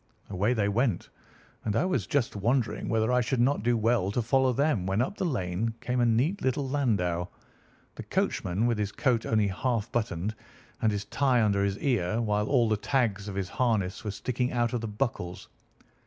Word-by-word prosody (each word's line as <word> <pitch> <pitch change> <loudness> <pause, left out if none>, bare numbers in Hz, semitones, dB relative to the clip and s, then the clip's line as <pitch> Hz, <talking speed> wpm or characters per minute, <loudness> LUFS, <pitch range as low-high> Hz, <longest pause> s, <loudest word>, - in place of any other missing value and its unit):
"Away 100 +5 +1
they 105 -3 +1
went, 110 -1 0 0.5
and 105 -2 -1
I - - +2
was 185 0 -1
just 140 -8 0
wondering 115 +1 0
whether 110 +1 +1
I 125 0 +3
should 120 +2 -1
not 130 0 +2
do 120 +2 +2
well 115 -3 +2
to 120 - 0
follow 130 +3 +3
them 130 -7 +1
when 95 +2 0
up 130 +11 0
the - - -1
lane 110 - -2
came 125 0 -2
a 120 - +3
neat 130 - +1
little 130 +1 0
landau, 100 -11 0 0.7
the - - -8
coachman 95 +5 -1
with 120 -3 +1
his 105 -1 -1
coat 125 -4 0
only 105 -2 +2
half 115 +2 -1
buttoned, 105 -3 -1 0.5
and 110 - +3
his 100 -1 -3
tie 130 +2 +2
under 100 -2 +2
his 100 0 0
ear, 110 -6 0
while 105 -2 0
all 125 -4 +3
the 110 -1 +1
tags 105 -4 0
of 100 - -5
his 95 -1 -2
harness 105 -6 0
were 105 - -3
sticking 125 +5 -2
out 120 -1 0
of 120 - -1
the 115 - -3
buckles. 105 -5 -3
115 Hz, 200 wpm, -28 LUFS, 100-125 Hz, 0.7 s, I